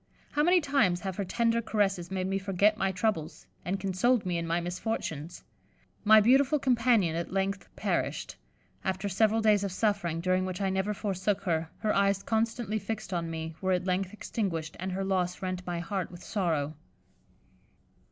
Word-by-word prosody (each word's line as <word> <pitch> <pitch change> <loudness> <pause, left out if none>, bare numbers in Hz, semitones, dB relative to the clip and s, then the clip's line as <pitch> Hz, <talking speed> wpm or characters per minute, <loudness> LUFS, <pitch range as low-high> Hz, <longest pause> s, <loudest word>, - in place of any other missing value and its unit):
How 295 - +1
many 355 +4 +5
times 270 - +2
have 190 -2 -4
her 200 - 0
tender 230 +4 +1
caresses 195 -6 0
made 190 -1 -2
me 195 +1 0
forget 200 +2 +2
my 195 -2 0
troubles, 180 -5 -2 0.2
and 185 +4 -2
consoled 195 +5 +1
me 175 -2 0
in 170 - -4
my 170 +1 +1
misfortunes. 175 -3 -4 0.6
My 215 0 +8
beautiful 270 +6 +4
companion 235 - +3
at 170 +1 -3
length 195 +1 -1
perished. - - -2 0.5
After 190 +1 -1
several 220 +3 +2
days 210 -2 +4
of 200 - -2
suffering, 190 -5 0
during 185 +2 +1
which 185 -1 -4
I 195 -1 0
never 190 +2 0
forsook 195 0 -1
her, 165 -3 0
her 215 -1 +1
eyes 200 0 +2
constantly 225 -1 0
fixed 215 -1 -5
on 170 -1 -1
me, 160 0 -4
were 190 -1 +2
at 180 0 0
length 185 0 0
extinguished; 175 -7 -3
and 190 +1 -3
her 190 +1 -2
loss 185 -2 0
rent 185 -1 -2
my 175 -1 -2
heart 180 +2 -3
with 175 0 -11
sorrow." 160 -8 -1
190 Hz, 175 wpm, -29 LUFS, 180-215 Hz, 0.6 s, My